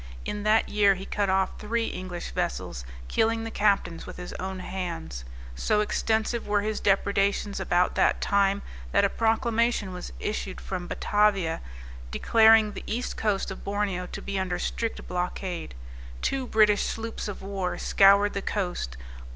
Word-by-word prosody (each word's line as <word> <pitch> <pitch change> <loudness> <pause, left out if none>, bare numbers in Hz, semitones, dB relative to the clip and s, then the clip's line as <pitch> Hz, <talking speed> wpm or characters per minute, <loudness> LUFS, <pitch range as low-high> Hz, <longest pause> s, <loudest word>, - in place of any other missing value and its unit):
In 210 - -3
that 215 +2 +3
year 200 -2 +4
he 190 +1 -7
cut 200 -1 -1
off 190 0 +1
three 230 +2 -1
English 185 -4 -5
vessels, - - -3 0.2
killing 225 - +1
the 225 - -5
captains 195 -6 +1
with - - -8
his 180 0 -7
own 190 0 -4
hands. 80 - -5 0.3
So 135 - +1
extensive 220 +2 0
were 205 0 +2
his 215 +1 -2
depredations 200 +1 +1
about 175 +1 +2
that - - +3
time 200 0 +2 0.3
that - - +5
a - - +2
proclamation 225 -2 +1
was 180 - -7
issued 200 -3 -3
from 180 -2 -5
Batavia, 195 -6 +1 0.5
declaring 220 - +5
the - - -8
east 240 +3 -2
coast 205 -4 0
of 190 - -8
Borneo 200 -3 -1
to - - -7
be 200 -1 -2
under 185 -1 -1
strict 230 -1 -3
blockade. 180 - -3 0.5
Two 265 -2 0
British 210 -2 +4
sloops 225 0 -3
of 205 - -6
war 195 -2 -2
scoured 200 +1 +5
the 200 - -2
coast. 175 - -3
200 Hz, 155 wpm, -27 LUFS, 185-215 Hz, 0.5 s, that